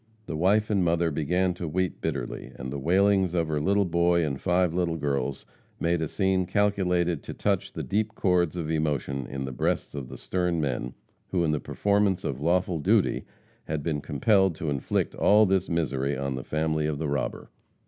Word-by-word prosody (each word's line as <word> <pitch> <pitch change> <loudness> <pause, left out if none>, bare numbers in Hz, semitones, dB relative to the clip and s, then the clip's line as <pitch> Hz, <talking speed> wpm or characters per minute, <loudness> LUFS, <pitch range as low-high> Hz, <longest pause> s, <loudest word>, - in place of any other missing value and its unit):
The 80 - -5
wife 100 +7 +2
and 100 -3 +2
mother 85 -1 +2
began 90 +5 +1
to 90 -1 -5
weep 90 +3 -2
bitterly, 70 -6 -4
and 65 +2 -6
the 70 - -3
wailings 95 +3 +3
of 85 -2 +1
her 75 -1 0
little 100 +4 +2
boy 85 -1 +2
and 70 -3 -3
five 90 -1 +2
little 85 -2 0
girls, 70 -2 -2 0.3
made 85 0 +1
a 80 - 0
scene 95 +1 +1
calculated 90 -5 +1
to - - -8
touch - - 0
the - - -4
deep 105 +2 -1
chords 90 -3 +2
of 80 -3 -3
emotion 70 -4 -1
in 65 0 -4
the 65 - -5
breasts 65 - -1
of 70 -4 -6
the - - -8
stern 90 -2 -1
men, 65 -4 -2 0.3
who 90 -2 0
in 80 - +2
the 75 - 0
performance 100 0 +1
of 65 0 -3
lawful 90 +1 +1
duty 75 - +2 0.4
had 75 -2 -3
been 75 -3 -1
compelled 95 +6 +2
to 80 -1 -3
inflict 70 -2 -1
all 105 +1 +5
this 95 -1 +1
misery 70 -5 -1
on 70 0 -2
the 65 -1 -5
family 80 0 0
of 75 -2 -2
the 80 +1 -2
robber. 70 0 -3
85 Hz, 195 wpm, -27 LUFS, 75-95 Hz, 0.4 s, all